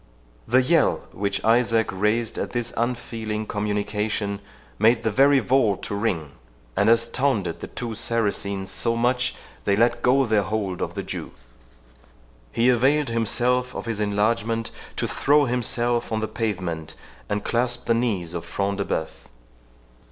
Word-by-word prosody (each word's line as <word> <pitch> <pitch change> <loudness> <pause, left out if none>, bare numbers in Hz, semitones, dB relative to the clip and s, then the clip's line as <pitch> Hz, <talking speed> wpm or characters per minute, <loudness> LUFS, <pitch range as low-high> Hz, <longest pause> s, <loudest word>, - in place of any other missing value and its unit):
The 130 +2 +4
yell 155 +3 +2
which 100 +1 -2
Isaac 115 -1 +3
raised 105 +4 0
at - - -4
this 120 -1 -2
unfeeling 115 -2 -2
communication 105 0 -2 0.4
made 115 +2 +4
the 110 - +1
very 140 +5 +5
vault 120 -5 +2
to - - -4
ring, 90 -9 -1 0.4
and 100 +2 +3
astounded 115 -2 +2
the - - -6
two 120 -2 -5
Saracens 100 -4 -1
so 115 +4 0
much 125 +2 +1
that - - -17 0.3
they 100 - +3
let 120 +2 +2
go 135 +2 +4
their 110 -3 +2
hold 100 -2 -2
of - - -3
the - - -3
Jew. - - -6 1.2
He 115 - +2
availed 135 +4 +3
himself 125 +2 0
of - - -5
his 115 -2 -2
enlargement 115 +2 0 0.2
to - - -1
throw 145 +1 +3
himself 120 -1 0
on 110 - 0
the 110 - -2
pavement, 90 -9 -3 0.3
and 105 0 -1
clasp 120 +1 -1
the 115 - +3
knees 105 -8 -1
of 85 - -4
Front 100 0 -2
de 100 - 0
Bœuf. 80 - -1
115 Hz, 150 wpm, -24 LUFS, 105-120 Hz, 1.2 s, very